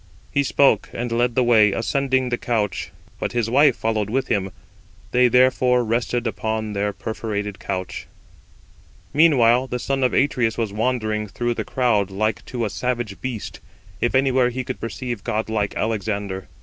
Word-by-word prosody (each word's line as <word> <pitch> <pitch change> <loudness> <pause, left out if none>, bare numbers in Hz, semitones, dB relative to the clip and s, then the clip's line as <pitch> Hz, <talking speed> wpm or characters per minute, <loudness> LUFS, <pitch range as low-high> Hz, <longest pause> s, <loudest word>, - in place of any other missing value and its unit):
He 140 - +2
spoke, 135 -6 +3
and 120 0 -3
led 120 0 +1
the 130 - +3
way, 110 -4 +5
ascending 130 +2 0
the 120 - 0
couch; 105 -5 -1 0.3
but - - -3
his 115 -2 0
wife 140 0 +5
followed 110 -2 -1
with 130 +3 -1
him: 95 -2 0 0.6
they 125 0 +5
therefore 125 0 +4
rested 120 +1 -1
upon 110 0 -2
their 100 0 0
perforated 105 -2 -4
couch. 95 -2 -5 1.1
Meanwhile 130 -5 +4
the 125 - -3
son 135 +2 -1
of 125 - +3
Atreus 125 -5 +1
was 110 -4 -2
wandering 110 -2 -1
through 120 +4 -2
the - - -3
crowd 115 -6 +1
like 110 +2 -1
to 120 -3 -2
a - - -2
savage 120 -3 -3
beast, 125 -5 -5 0.4
if 120 - +1
anywhere 130 -2 +3
he 130 +1 -4
could 130 +1 -5
perceive 120 -2 -5
godlike 110 -2 -1
Alexander. 100 -3 -2
115 Hz, 160 wpm, -22 LUFS, 105-125 Hz, 1.1 s, way